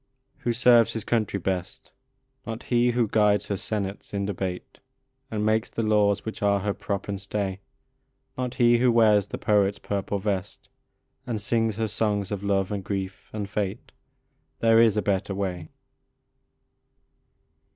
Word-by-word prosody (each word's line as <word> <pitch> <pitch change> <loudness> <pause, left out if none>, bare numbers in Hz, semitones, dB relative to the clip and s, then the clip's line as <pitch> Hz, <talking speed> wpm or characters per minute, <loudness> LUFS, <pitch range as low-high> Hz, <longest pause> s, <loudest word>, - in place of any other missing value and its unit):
Who 120 - -1
serves 120 -1 +5
his 110 - -3
country 110 -3 0
best? 95 0 -4 0.6
Not 115 +1 -5
he 120 0 +2
who 120 -2 +2
guides 105 -1 +2
her 100 - 0
senates 100 0 -4
in 100 0 -1
debate, 95 -2 -5 0.5
And 105 -1 -2
makes 110 +1 +1
the 115 - -3
laws 105 -2 +2
which 110 - -6
are 100 -1 +2
her 100 +1 -1
prop 100 -1 -4
and 100 -1 -4
stay; 100 -1 -3 0.8
Not 125 -1 -3
he 120 -2 +4
who 125 0 +4
wears 105 -3 +4
the - - -5
poet 100 -1 +2
s - - -12
purple 100 0 -3
vest, 95 -2 -3 0.6
And 115 -3 -2
sings 115 0 0
her 110 +1 -1
songs 105 -2 -1
of 100 -2 -3
love 100 -1 0
and 100 -2 -3
grief 95 -1 -5
and 105 -2 -4
fate: 105 +1 -4 0.7
There 115 0 +5
is 110 -2 +4
a 105 - +1
better 95 0 -1
way. 90 -4 -3
105 Hz, 160 wpm, -26 LUFS, 100-110 Hz, 0.8 s, serves